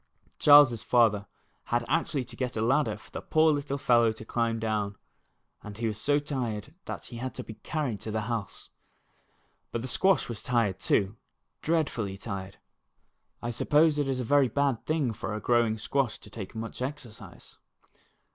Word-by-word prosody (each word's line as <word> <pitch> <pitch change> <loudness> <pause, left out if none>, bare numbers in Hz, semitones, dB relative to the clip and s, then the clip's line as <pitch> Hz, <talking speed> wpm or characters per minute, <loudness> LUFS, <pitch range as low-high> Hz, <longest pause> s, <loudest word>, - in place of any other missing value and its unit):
Charles's 145 -6 +7
father 110 -5 +3 0.4
had 120 0 0
actually 150 -2 0
to 125 -1 -11
get 125 -2 -3
a - - 0
ladder 135 +6 +2
for - - -17
the - - -5
poor 155 0 +3
little 145 -1 -1
fellow 120 -4 +4
to 110 0 -11
climb 115 0 0
down, 105 -2 -1 0.7
and 105 -1 -9
he 115 - -2
was 110 -1 -2
so 145 0 +3
tired 130 -4 -3
that - - -6
he 120 - -8
had 130 0 -5
to - - -5
be 110 - -9
carried 135 -3 -3
to - - -5
the 110 0 -1
house. 110 -2 -5 1.0
But 115 - -3
the - - -4
squash 190 +7 +2
was 115 -3 -4
tired, 115 -6 0
too, 100 +2 +1 0.4
dreadfully 130 -12 -1
tired. 100 -2 -6 0.9
I 120 - -2
suppose 150 +5 +3
it 145 - +1
is 130 -1 -1
a - - -1
very 140 +2 +4
bad 135 0 0
thing 155 -7 +1
for 105 0 -4
a - - -3
growing 115 0 +2
squash 130 +2 -1
to 105 - -13
take 100 -2 -8
much 115 +2 -6
exercise. 130 -4 -8
120 Hz, 175 wpm, -28 LUFS, 110-140 Hz, 1.0 s, Charles's